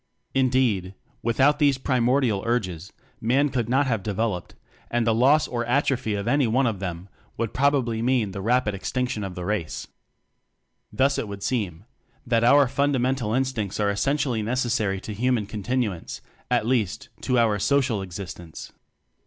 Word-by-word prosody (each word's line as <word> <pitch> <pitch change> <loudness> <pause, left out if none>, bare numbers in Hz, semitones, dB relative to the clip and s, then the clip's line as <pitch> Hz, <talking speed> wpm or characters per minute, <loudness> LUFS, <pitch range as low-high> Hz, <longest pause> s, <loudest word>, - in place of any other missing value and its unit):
Indeed, 125 -8 +1 0.3
without 135 +6 +3
these 140 -3 +4
primordial 125 -4 +1
urges 95 -6 -2 0.3
Man 135 +6 +2
could 120 -4 -2
not 135 +3 +3
have 115 -6 0
developed, 105 -2 -2 0.3
and 120 -1 0
the 115 - +3
loss 135 +7 +4
or 120 -1 -2
atrophy 125 -3 +1
of 100 +2 -4
any 140 0 +3
one 130 +5 +2
of 110 -5 -1
them 90 -1 -5 0.3
would 115 -1 -2
probably 130 -5 +1
mean 120 -4 +1
the 100 - -6
H - - -4
6 - - -7
<=> - - -7
rapid 125 -3 +2
extinction 125 +3 -2
of 95 -2 -5
the 90 - -5
race. 100 -5 -2 1.1
Thus 140 +1 +2
it - - -3
would 100 -1 -7
seem 105 -7 -2 0.4
that 115 -2 +2
our 140 +3 +6
fundamental 130 -4 0
instincts 125 -7 -1
are 100 -1 +2
essentially 125 +2 0
necessary 110 -4 0
to 110 - -6
human 120 0 0
continuance 105 -2 -3 0.3
at - - +2
least, 115 -6 -1
to 125 - +1
our 110 -3 +3
social 130 -3 +1
existence. 90 -3 -8
115 Hz, 160 wpm, -25 LUFS, 100-130 Hz, 1.1 s, our